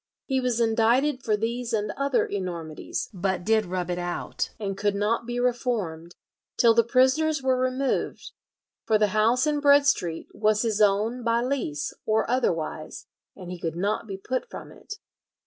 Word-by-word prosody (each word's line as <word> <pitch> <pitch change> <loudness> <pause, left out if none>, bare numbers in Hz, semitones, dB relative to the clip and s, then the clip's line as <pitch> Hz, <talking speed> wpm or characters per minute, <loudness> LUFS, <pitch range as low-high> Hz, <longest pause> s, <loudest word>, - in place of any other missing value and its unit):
He 265 -1 0
was 250 -2 0
indicted 235 +5 +2
for 215 -3 +1
these 235 +2 -3
and 210 -1 0
other 275 -2 +1
enormities, 170 -5 -4
"but 190 -1 -2
did 220 0 +2
rub 180 -1 -3
it 175 - -2
out, 175 0 -3
and 195 -2 -3
could 205 +1 0
not 220 +3 0
be 240 0 -2
reformed, 215 -10 -2 0.4
till 230 -1 +6
the 230 +1 +4
prisoners 265 +5 +2
were 260 -1 +3
removed; 255 +1 -1 0.5
for 220 - +3
the 210 -1 +2
house 230 +5 +3
in 300 -1 +1
Bread 285 0 +5
Street 170 - 0
was 215 +1 +2
his 220 -2 0
own 215 +4 +2
by 230 0 +2
lease 245 - -2
or 220 0 +1
otherwise, 165 -11 -2 0.3
and 180 -2 -9
he 180 - -6
could 165 -1 -3
not 205 +5 -1
be 195 -2 -5
put 255 +6 -3
from - - -9
it." 415 - -9
225 Hz, 170 wpm, -26 LUFS, 195-250 Hz, 0.5 s, till